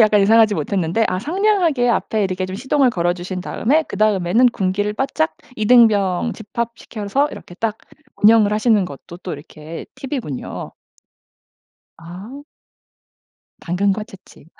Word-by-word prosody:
약간 215 -1 +5
예상하지 220 +1 +5
못했는데 180 +5 0
아 185 - -1
상냥하게 335 - +1
앞에 220 -2 0
이렇게 185 0 -2
좀 185 +1 -6
시동을 265 +3 +2
걸어주신 180 -1 -2
다음에 290 - +1
그다음에는 210 - +2
군기를 205 -1 -1
바짝 305 +6 -1 0.2
이등병 215 -3 +4
집합시켜서 235 +3 -3
이렇게 175 - -11
딱 220 +3 -2 0.5
운영을 215 -1 +6
하시는 215 -2 +3
것도 170 +2 -10
또 180 - -6
이렇게 155 +2 -9
팁이군요. 255 - -6 1.3
아. 185 +12 -10 1.2
당근과 195 +4 0
채찍. 195 -7 -17
210 Hz, 310 characters per minute, -19 LUFS, 185-235 Hz, 1.3 s, 운영을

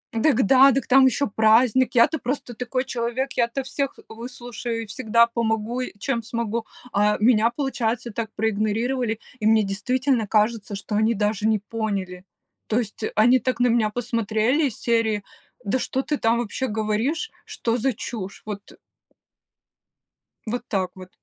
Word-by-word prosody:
Дак 235 +2 +3
да, 270 +5 +7
да 270 - +2
к - - -18
там 265 +1 +6
ещё 280 +3 +1
праздник, 230 +3 +4
я-то 255 +6 +4
просто 250 -1 -4
такой 250 +3 -2
человек, 255 +2 -2
я-то 240 +3 0
всех 275 +1 -3
выслушаю 235 0 -6
и - - -8
всегда 230 +1 +3
помогу, 230 +1 -1
и 250 - -4
чем 235 +2 -1
смогу. 230 0 -3 0.3
А 210 +1 +2
меня, 225 0 +4
получается, 240 -4 -2
так 220 +1 -4
проигнорировали, 220 +2 0 0.2
и 215 - -3
мне 220 -1 +5
действительно 240 +4 0
кажется, 215 0 +1
что 205 +1 -5
они 220 +2 +2
даже 210 +1 0
не 220 -1 +3
поняли. 200 -4 -4 0.4
То 220 - 0
есть 220 -2 -5
они 245 +4 +5
так 250 +1 -2
на 245 - +4
меня 230 -2 +2
посмотрели 230 +4 0
из 230 - -6
серии: 225 -3 +1 0.4
да 210 +6 0
что 265 +1 -2
ты 295 - -1
там 230 -1 +2
вообще 240 +3 -2
говоришь? 220 - -1
Что 245 - -2
за 265 +3 +1
чушь! 200 -3 -7
Вот, 205 -1 -7
э - - -16 1.7
Вот 240 +2 -2
так 190 -3 -1
вот. 185 -1 -11
230 Hz, 160 wpm, -23 LUFS, 215-250 Hz, 1.7 s, да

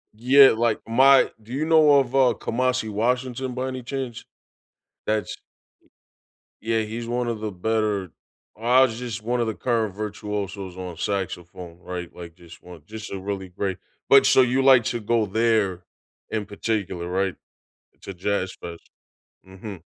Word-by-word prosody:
Yeah, 130 +5 +7
like, 115 -1 0
my 135 +4 +5
do 115 +4 -11
you 150 +3 -1
know 155 -2 +5
of, 130 -1 -2
uh, 130 -3 +4
Kamasi 125 -2 -1
Washington 125 +3 -1
by 130 +1 -3
any 130 -1 -5
chance? 130 -2 -5 0.8
That's 110 0 -1 1.2
Y 110 - -13
Yeah, 115 -1 +2
he's 115 +2 -6
one 120 0 -1
of 115 -2 -3
the 110 0 -3
better 105 -1 -1 0.5
Kamasi's 120 +1 +3
just 120 -3 -5
one 120 +2 -1
of 120 - +1
the 110 - -2
current 115 -5 -1
virtuosos 105 -2 -5
on 90 -2 -7
saxophone, 90 -2 -4
right? 90 -1 -7
Like 85 -2 -10
just 85 -1 -16
one 90 -3 -13
just 110 0 -8
a 100 - -4
really 95 0 -5
great 95 0 -3 0.3
but 135 -1 +7
so 130 - +6
you 130 +2 +1
like 130 -3 +6
to 120 - -2
go 115 +1 +1
there 105 -4 +1 0.5
in 110 -2 -2
particular, 100 -4 -3
right? 95 +1 -1 0.7
To 100 - -7
Jazz 95 +1 -2
Fest. 85 -1 -10 0.6
Mhm. 95 -1 -10
110 Hz, 155 wpm, -24 LUFS, 95-125 Hz, 1.2 s, Yeah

